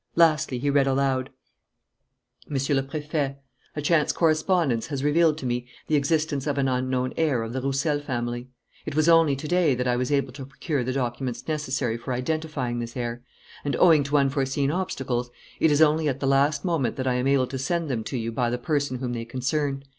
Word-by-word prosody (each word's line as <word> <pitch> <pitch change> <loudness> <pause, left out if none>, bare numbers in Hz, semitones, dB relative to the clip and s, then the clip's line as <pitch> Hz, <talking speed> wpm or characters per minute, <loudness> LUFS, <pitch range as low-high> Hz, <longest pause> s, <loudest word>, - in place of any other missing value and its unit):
Lastly, 155 -5 +3
he 140 +3 0
read 140 -1 +3
aloud: 135 -1 +1 1.2
"MONSIEUR 135 0 0
LE - - -6
PRÉFET: 145 -1 -2 0.4
"A 150 - -2
chance 150 -1 +3
correspondence 155 -6 +1
has 140 -2 -4
revealed 155 +1 +3
to 140 - -6
me 125 0 -2 0.2
the 155 - +1
existence 150 -1 0
of 145 -1 -1
an 135 -1 +2
unknown 130 0 -1
heir 145 -8 +1
of 115 +1 -6
the 130 - -2
Roussel 140 +3 0
family. 120 -3 -3 0.4
It - - -4
was 155 +1 +3
only 165 -4 +5
to 140 +3 -6
day 175 -5 +3
that 125 +1 -2
I 125 - +2
was 125 +2 -1
able 140 -3 0
to 135 0 -8
procure 135 +1 -2
the 130 - -2
documents 125 -1 -3
necessary 135 -6 -1
for 125 +2 -4
identifying 135 -2 -2
this 120 +1 -6
heir; 120 0 -3 0.4
and, 140 -3 -1
owing 160 -2 +6
to 145 +1 +2
unforeseen 135 0 +1
obstacles, 135 -9 -2 0.3
it 160 - +4
is 150 +1 +5
only 155 0 +3
at 135 0 -3
the 140 - -2
last 140 +2 +2
moment 155 -10 0
that 130 - -3
I 130 - +2
am 125 +1 0
able 135 -2 +3
to 130 +1 -5
send 170 +5 -1
them 120 -5 -2
to 130 - -3
you 115 0 -3
by 120 +1 0
the 120 - -1
person 140 0 -1
whom 125 -1 -3
they 115 -1 -3
concern. 135 +3 -2
135 Hz, 205 wpm, -25 LUFS, 125-150 Hz, 1.2 s, owing